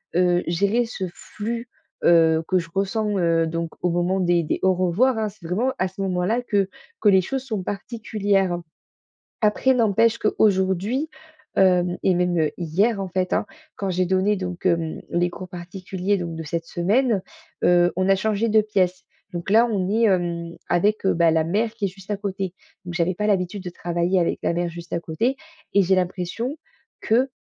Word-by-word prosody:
heu, 180 Hz, 0 st, +3 dB
gérer 200 Hz, +8 st, +1 dB
ce 215 Hz, -5 st, -4 dB
flux, 230 Hz, +5 st, -5 dB, 0.4 s
heu, 165 Hz, -1 st, +5 dB
que 185 Hz, -1 st, +2 dB
je 165 Hz, -, -7 dB
ressens, 205 Hz, +1 st, 0 dB
heu, 165 Hz, -2 st, +2 dB
donc 165 Hz, 0 st, -3 dB
au 180 Hz, -, +1 dB
moment 175 Hz, +2 st, +1 dB
des 175 Hz, -2 st, +2 dB
des -, -, -2 dB
au 190 Hz, 0 st, +4 dB
revoirs, 190 Hz, +8 st, +2 dB
hein. 215 Hz, -1 st, 0 dB
C'est 190 Hz, -4 st, -12 dB
vraiment 230 Hz, +10 st, 0 dB
à 185 Hz, -, +2 dB
ce 190 Hz, +2 st, -8 dB
moment-là 190 Hz, +5 st, 0 dB
que 200 Hz, -4 st, +1 dB, 0.3 s
que 210 Hz, -, +5 dB
les 190 Hz, -1 st, +6 dB
choses 265 Hz, +7 st, -3 dB
sont 215 Hz, -7 st, -3 dB
particulières. 200 Hz, -3 st, -1 dB, 0.8 s
Après, 220 Hz, +5 st, +3 dB
n'empêche 230 Hz, 0 st, +3 dB
qu'aujourd'hui, 210 Hz, -, +1 dB, 0.5 s
hem- 180 Hz, -2 st, +3 dB
et 190 Hz, -, +4 dB
même 180 Hz, 0 st, +1 dB
heu, 155 Hz, -2 st, +1 dB
hier, 195 Hz, +6 st, +1 dB
en 195 Hz, -, -3 dB
fait- 185 Hz, 0 st, -1 dB
hein, -, -, +1 dB, 0.3 s
quand 195 Hz, -, -3 dB
j'ai 185 Hz, 0 st, +1 dB
donné 190 Hz, +3 st, +2 dB
donc 180 Hz, -2 st, -5 dB
hem, 165 Hz, -2 st, 0 dB
les 175 Hz, +1 st, +1 dB
cours 185 Hz, 0 st, -8 dB
particuliers, 185 Hz, +2 st, -3 dB
donc 170 Hz, -2 st, -4 dB
de 160 Hz, -, -5 dB
cette 165 Hz, +2 st, -3 dB
semaine, 205 Hz, +5 st, +1 dB, 0.4 s
heu, 175 Hz, 0 st, +5 dB
on 185 Hz, +1 st, +1 dB
a 195 Hz, -, +6 dB
changé 215 Hz, +3 st, 0 dB
de 215 Hz, 0 st, +5 dB
pièce. 190 Hz, -4 st, 0 dB, 0.3 s
Donc 175 Hz, +1 st, -4 dB
là, 225 Hz, +3 st, +6 dB
on 200 Hz, -5 st, -1 dB
est, 225 Hz, +3 st, +2 dB
hem, 170 Hz, -3 st, 0 dB
avec, 205 Hz, +3 st, +2 dB
heu, -, -, +4 dB
bah, 170 Hz, -1 st, +4 dB
la 160 Hz, 0 st, +2 dB
mère 215 Hz, +7 st, 0 dB
qui 215 Hz, -3 st, -2 dB
est -, -, +2 dB
juste 195 Hz, +2 st, -9 dB
à 205 Hz, -, 0 dB
côté. 195 Hz, -2 st, -4 dB, 0.3 s
Donc, 175 Hz, -, -6 dB
j'avais 175 Hz, +1 st, 0 dB
pas 210 Hz, -, -2 dB
l'habitude 190 Hz, -1 st, 0 dB
de 180 Hz, -, -4 dB
travailler 175 Hz, +2 st, 0 dB
avec 170 Hz, -, 0 dB
la -, -, +1 dB
mère 175 Hz, 0 st, -1 dB
juste 170 Hz, 0 st, -9 dB
à 170 Hz, -, 0 dB
côté 230 Hz, -, -1 dB, 0.4 s
et 200 Hz, -, +5 dB
j'ai 190 Hz, 0 st, +3 dB
l'impression 185 Hz, -, -2 dB, 0.5 s
que 250 Hz, +5 st, +2 dB
185 Hz, 195 wpm, -23 LUFS, 175-210 Hz, 0.8 s, les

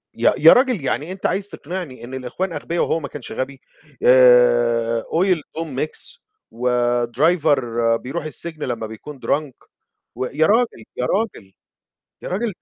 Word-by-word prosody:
يا -, -, +3 dB
يا -, -, +8 dB
رجل 250 Hz, -, +2 dB
يعني 150 Hz, +6 st, -1 dB
أنت 190 Hz, -, -7 dB
عايز 200 Hz, +1 st, 0 dB
تقنعني 165 Hz, -6 st, -7 dB
إن 125 Hz, -, -9 dB
الإخوان 130 Hz, +9 st, -4 dB
أغبيه 170 Hz, +1 st, -3 dB
وهو 165 Hz, -, +1 dB
ما 140 Hz, -, -6 dB
كانش 140 Hz, -2 st, -9 dB
غبي! 135 Hz, +1 st, -5 dB, 0.4 s
آآ، 120 Hz, -2 st, +5 dB
oil 185 Hz, +3 st, +1 dB, 0.2 s
to 165 Hz, -, -1 dB
mix 155 Hz, -, -5 dB, 0.3 s
وdriver 125 Hz, +6 st, +2 dB, 0.4 s
بيروح 135 Hz, +8 st, -5 dB
السجن 155 Hz, 0 st, -6 dB
لمّا 115 Hz, -3 st, -3 dB
بيكون 130 Hz, +6 st, -10 dB
drunk 145 Hz, -3 st, -2 dB, 0.5 s
و 130 Hz, -, -2 dB
يا 150 Hz, +5 st, +1 dB
رجل، 225 Hz, -, +1 dB
يا 125 Hz, -, 0 dB
رجل! 195 Hz, -, -2 dB, 0.7 s
يا -, -, -6 dB
رجل 210 Hz, +4 st, -2 dB
ده -, -, -68 dB
140 Hz, 150 wpm, -21 LUFS, 125-170 Hz, 0.7 s, يا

